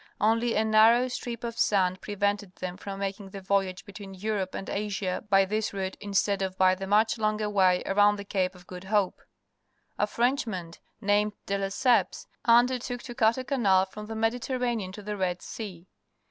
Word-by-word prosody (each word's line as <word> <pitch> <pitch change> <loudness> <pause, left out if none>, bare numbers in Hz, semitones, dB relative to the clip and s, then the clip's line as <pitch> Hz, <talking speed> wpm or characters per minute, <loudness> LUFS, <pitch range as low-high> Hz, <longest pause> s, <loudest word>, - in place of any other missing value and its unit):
Only 230 +2 +2
a 220 - +2
narrow 225 +3 +5
strip 240 -1 -5
of 230 -1 -5
sand 185 -2 +2
prevented 205 -2 -2
them 180 -1 -5
from 195 +1 -7
making 195 0 -4
the 195 - -8
voyage 195 -1 -1
between 200 -1 -10
Europe 195 -1 -2
and 195 - -5
Asia 200 -2 -2
by 195 -1 +5
this 215 +2 -2
route 190 -1 -3
instead 200 0 0
of 190 -1 -3
by 185 0 +5
the 190 +1 -5
much 220 +3 +3
longer 215 0 0
waj^ 190 -3 +2
arovmd 205 +1 +4
the 200 - -7
Ca^e_Qf_QooiLIln4ie. 185 +1 -1 0.9
A 210 - +2
Frenchman 225 - -1 0.3
named 205 0 +2
De 200 - -1
Lesseps 240 - +1 0.2
undertook 245 +1 +3
to 240 - -7
cut 225 0 +3
a 260 - -3
canal 205 -9 +3
from 210 +2 -9
the 225 - -6
Mediterranean 235 -2 -1
to 210 +2 -10
the 210 +1 -4
Red 180 -2 -2
Sea. 185 -6 -8
205 Hz, 170 wpm, -27 LUFS, 190-225 Hz, 0.9 s, narrow